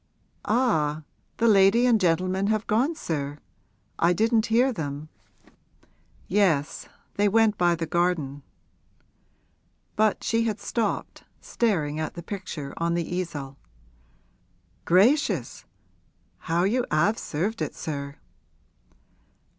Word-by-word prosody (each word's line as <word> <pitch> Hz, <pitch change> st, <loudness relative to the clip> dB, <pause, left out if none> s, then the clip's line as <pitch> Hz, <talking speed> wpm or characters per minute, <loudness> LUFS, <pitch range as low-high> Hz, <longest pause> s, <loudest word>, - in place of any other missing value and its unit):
'Ah, 160 Hz, -, +1 dB, 0.3 s
the 230 Hz, -, +2 dB
lady 205 Hz, +3 st, +5 dB
and 230 Hz, -4 st, +3 dB
gentleman 185 Hz, +3 st, +1 dB
have 215 Hz, 0 st, 0 dB
gone, 250 Hz, +9 st, +1 dB
sir? 145 Hz, -, -4 dB, 0.6 s
I 170 Hz, +1 st, +4 dB
didn't 225 Hz, +3 st, +2 dB
hear 245 Hz, +4 st, +3 dB
them.' 150 Hz, -3 st, -5 dB, 1.2 s
'Yes; 175 Hz, -7 st, +1 dB, 0.3 s
they 205 Hz, 0 st, +3 dB
went 220 Hz, 0 st, +3 dB
by 175 Hz, -2 st, +2 dB
the 165 Hz, 0 st, -3 dB
garden.' 160 Hz, -4 st, -1 dB, 1.5 s
But 215 Hz, -1 st, +1 dB
she 230 Hz, 0 st, +1 dB
had 215 Hz, -2 st, -2 dB
stopped, 225 Hz, -4 st, -3 dB, 0.2 s
staring 160 Hz, -10 st, -1 dB
at 155 Hz, -, -4 dB
the 170 Hz, -, -7 dB
picture 175 Hz, -7 st, -6 dB
on 170 Hz, 0 st, 0 dB
the 170 Hz, -2 st, -2 dB
easel. 145 Hz, -7 st, -5 dB, 1.3 s
'Gracious, 225 Hz, -, +2 dB, 0.8 s
how 170 Hz, +2 st, +2 dB
you 240 Hz, +6 st, +1 dB
'ave 185 Hz, +9 st, +2 dB
served 200 Hz, +9 st, -3 dB
it, -, -, -3 dB
sir!' 140 Hz, -2 st, -5 dB
185 Hz, 110 wpm, -25 LUFS, 155-220 Hz, 1.5 s, lady